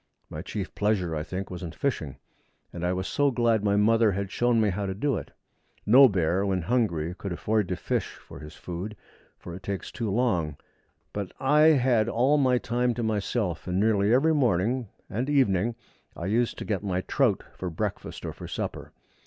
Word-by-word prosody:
My 75 Hz, -, -5 dB
chief 100 Hz, +1 st, -5 dB
pleasure, 100 Hz, -6 st, 0 dB
I 75 Hz, -, -2 dB
think, 95 Hz, +5 st, -5 dB
was 90 Hz, -, -6 dB
in 85 Hz, -3 st, -6 dB
fishing, 80 Hz, -, -2 dB, 0.6 s
and 85 Hz, -, -6 dB
I 90 Hz, -, +1 dB
was 95 Hz, +1 st, -3 dB, 0.2 s
glad 115 Hz, -3 st, +2 dB
my 100 Hz, -1 st, +2 dB
mother 110 Hz, +1 st, +4 dB
had 100 Hz, 0 st, -3 dB
shown 120 Hz, -1 st, +2 dB
me 105 Hz, -2 st, +3 dB
how 100 Hz, +2 st, -3 dB
to 95 Hz, -, -3 dB
do 140 Hz, +5 st, 0 dB
it. -, -, -5 dB, 0.6 s
No 130 Hz, +6 st, +8 dB
bear, 90 Hz, -1 st, +1 dB
when 95 Hz, -3 st, 0 dB
hungry, 90 Hz, -7 st, 0 dB
could 95 Hz, +1 st, -6 dB
afford 105 Hz, +3 st, 0 dB
to 90 Hz, -, -2 dB
fish 90 Hz, -, -2 dB
for -, -, -13 dB
his 75 Hz, 0 st, -10 dB
food, 90 Hz, +4 st, -6 dB, 0.4 s
for 85 Hz, -, -9 dB
it 90 Hz, -, -8 dB
takes 95 Hz, -1 st, -5 dB
too 115 Hz, -3 st, -3 dB
long; 90 Hz, -, 0 dB, 0.6 s
but 100 Hz, -3 st, -4 dB
I 150 Hz, +3 st, +5 dB
had 120 Hz, -4 st, +2 dB
all 130 Hz, +6 st, +3 dB
my 130 Hz, -2 st, +3 dB
time 120 Hz, 0 st, 0 dB
to 120 Hz, -, -2 dB
myself, 105 Hz, -4 st, -1 dB
and 90 Hz, +1 st, 0 dB
nearly 105 Hz, -1 st, +3 dB
every 145 Hz, +7 st, +4 dB
morning 120 Hz, -, +1 dB, 0.2 s
and 125 Hz, +7 st, -3 dB
evening 115 Hz, -6 st, +2 dB, 0.4 s
I 85 Hz, -, -6 dB
used 115 Hz, +5 st, +1 dB
to -, -, -6 dB
get 100 Hz, -4 st, -1 dB
my 95 Hz, -3 st, -1 dB
trout 115 Hz, +1 st, +1 dB
for 90 Hz, -, -5 dB
breakfast 80 Hz, -, -4 dB
or -, -, -4 dB
for -, -, -9 dB
supper. -, -, -5 dB
105 Hz, 195 wpm, -27 LUFS, 90-120 Hz, 0.6 s, No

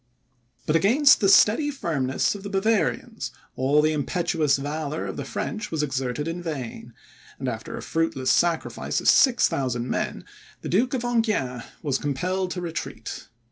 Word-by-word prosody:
But 155 Hz, -, +1 dB
against 250 Hz, -, +5 dB
the 195 Hz, -, +4 dB
steady 215 Hz, +9 st, +5 dB
firmness 145 Hz, -, -1 dB
of 200 Hz, -, -8 dB
the 200 Hz, -, -6 dB
Bavarians, 215 Hz, -, 0 dB, 0.3 s
all 140 Hz, +3 st, +3 dB
the 155 Hz, 0 st, +2 dB
impetuous 155 Hz, -1 st, +1 dB
valour 150 Hz, +2 st, -3 dB
of -, -, -5 dB
the 140 Hz, -, -4 dB
French 215 Hz, -, -4 dB
was 155 Hz, -2 st, -1 dB
exerted 135 Hz, +1 st, -2 dB
in 170 Hz, +2 st, -4 dB
vain, 145 Hz, -9 st, -6 dB, 0.4 s
and 130 Hz, -, -4 dB
after 115 Hz, -3 st, -4 dB
a -, -, -7 dB
fruitless 150 Hz, -6 st, 0 dB
sacrifice 170 Hz, +2 st, 0 dB
of -, -, -4 dB
6,000 130 Hz, -, +3 dB
men, -, -, -3 dB, 0.4 s
the -, -, -5 dB
Duke 245 Hz, +9 st, +2 dB
of 245 Hz, -, -2 dB
Enghien 215 Hz, -, 0 dB, 0.2 s
was 140 Hz, -4 st, 0 dB
compelled 180 Hz, +7 st, -1 dB
to 180 Hz, 0 st, -4 dB
retreat. 165 Hz, -2 st, -6 dB
160 Hz, 155 wpm, -25 LUFS, 135-200 Hz, 0.4 s, against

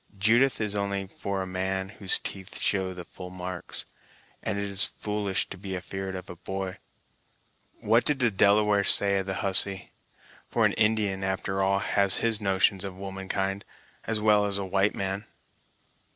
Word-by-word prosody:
Judith 120 Hz, +7 st, +3 dB
is 105 Hz, -2 st, -2 dB
only 100 Hz, -1 st, -2 dB
for 95 Hz, 0 st, -4 dB
a -, -, -6 dB
man 95 Hz, +1 st, -3 dB
whose 100 Hz, -2 st, +1 dB
teeth 95 Hz, -1 st, -8 dB
show 95 Hz, -2 st, -1 dB
the 90 Hz, -1 st, -8 dB
full 90 Hz, +1 st, -10 dB
marks, 90 Hz, -1 st, -6 dB, 0.6 s
and 105 Hz, -2 st, -3 dB
it's 100 Hz, -1 st, +1 dB
foolish 105 Hz, -2 st, -2 dB
to 95 Hz, -, -10 dB
be 95 Hz, -1 st, -5 dB
afeard 95 Hz, +1 st, -6 dB
of 90 Hz, -, -8 dB
a 90 Hz, -, -9 dB
boy. 95 Hz, +2 st, -6 dB, 1.0 s
What 115 Hz, +3 st, +2 dB
did 150 Hz, -, +1 dB
the 120 Hz, -4 st, +2 dB
Delawares 100 Hz, 0 st, +3 dB
say 100 Hz, -1 st, +8 dB
of 95 Hz, -, -5 dB
the 95 Hz, -, -3 dB
hussy? 95 Hz, -1 st, +4 dB, 0.6 s
for -, -, +1 dB
an -, -, +2 dB
Indian, 105 Hz, -3 st, +1 dB
after 95 Hz, 0 st, -2 dB
all, 95 Hz, 0 st, +2 dB
has 100 Hz, -1 st, +2 dB
his 115 Hz, -2 st, 0 dB
notions 95 Hz, -1 st, +1 dB
of 95 Hz, -2 st, -7 dB
woman 95 Hz, 0 st, -7 dB
kind, 95 Hz, 0 st, -2 dB, 0.4 s
as 115 Hz, -1 st, -1 dB
well 105 Hz, -1 st, +3 dB
as 100 Hz, -1 st, +1 dB
a 100 Hz, -, -3 dB
white 95 Hz, +2 st, +1 dB
man." 95 Hz, +2 st, -4 dB
95 Hz, 170 wpm, -27 LUFS, 95-105 Hz, 1.0 s, say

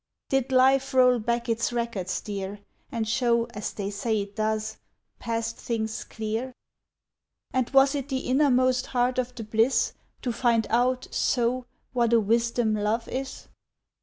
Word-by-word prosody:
"Did 270 Hz, -1 st, +1 dB
life 265 Hz, +1 st, +4 dB
roll 250 Hz, -1 st, +5 dB
back 235 Hz, +2 st, -1 dB
its 230 Hz, 0 st, 0 dB
records, 230 Hz, -6 st, -2 dB
dear, 200 Hz, 0 st, -5 dB, 0.3 s
And 225 Hz, -2 st, -2 dB
show, 235 Hz, +1 st, +2 dB
as 210 Hz, -, -4 dB
they 200 Hz, -1 st, -4 dB
say 215 Hz, +2 st, -1 dB
it 200 Hz, 0 st, -8 dB
does, 220 Hz, 0 st, -1 dB, 0.4 s
past 230 Hz, 0 st, -2 dB
things 220 Hz, -2 st, -3 dB
clear? 225 Hz, +4 st, -4 dB, 1.0 s
"And 255 Hz, -2 st, +1 dB
was 275 Hz, 0 st, +5 dB
it 280 Hz, -1 st, -3 dB
the 260 Hz, -1 st, -1 dB
innermost 255 Hz, -2 st, +3 dB
heart 250 Hz, 0 st, +1 dB
of 250 Hz, 0 st, -3 dB
the 230 Hz, -, -6 dB
bliss 225 Hz, +4 st, +2 dB, 0.3 s
To 245 Hz, -, 0 dB
find 230 Hz, -2 st, +2 dB
out, 250 Hz, +2 st, +2 dB
so, 245 Hz, 0 st, 0 dB, 0.3 s
what 235 Hz, -2 st, +2 dB
a 230 Hz, -, +6 dB
wisdom 230 Hz, +1 st, +1 dB
love 215 Hz, +2 st, 0 dB
is? 265 Hz, +1 st, -5 dB
235 Hz, 150 wpm, -26 LUFS, 220-255 Hz, 1.0 s, a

